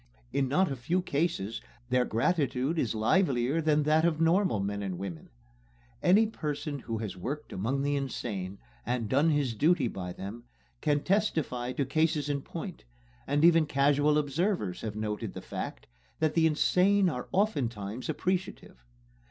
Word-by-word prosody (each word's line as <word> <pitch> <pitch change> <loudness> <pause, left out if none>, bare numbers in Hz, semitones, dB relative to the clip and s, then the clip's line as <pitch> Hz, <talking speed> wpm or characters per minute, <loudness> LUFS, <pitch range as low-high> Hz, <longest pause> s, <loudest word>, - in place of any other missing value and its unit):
In 135 -1 +1
not 175 +5 +2
a - - -1
few 170 +9 -1
cases 140 - -1 0.3
their 125 -1 +3
gratitude 140 +3 0
is 115 -5 0
livelier 135 - +2
than 150 -1 +2
that 155 +2 +3
of 165 -2 +2
normal 170 - +3
men 100 +1 -2
and 95 -3 -3
women. 90 -4 -7 0.7
Any 200 +5 +5
person 150 -7 -4
who 115 -2 -4
has 105 -3 -4
worked 145 +11 -5
among 125 +9 -1
the 145 0 +1
insane, 105 -8 -4 0.3
and 120 -1 -1
done 140 +8 +3
his 145 -6 +1
duty 155 +4 +3
by 90 -5 -5
them, 105 +6 -8 0.4
can 145 -2 +1
testify 160 - 0
to 140 - -1
cases 155 +1 +1
in 140 -1 -1
point; 170 +5 -7 0.4
and 145 +3 +3
even 165 -2 +5
casual 145 +1 +3
observers 145 - -1
have 110 -2 -4
noted 105 -1 -3
the - - -6
fact - - -6 0.3
that 155 -1 +1
the 165 -1 +4
insane 185 +5 +3
are 125 -7 -3
oftentimes 120 - -1
appreciative. 185 - -3
145 Hz, 155 wpm, -29 LUFS, 115-165 Hz, 0.7 s, Any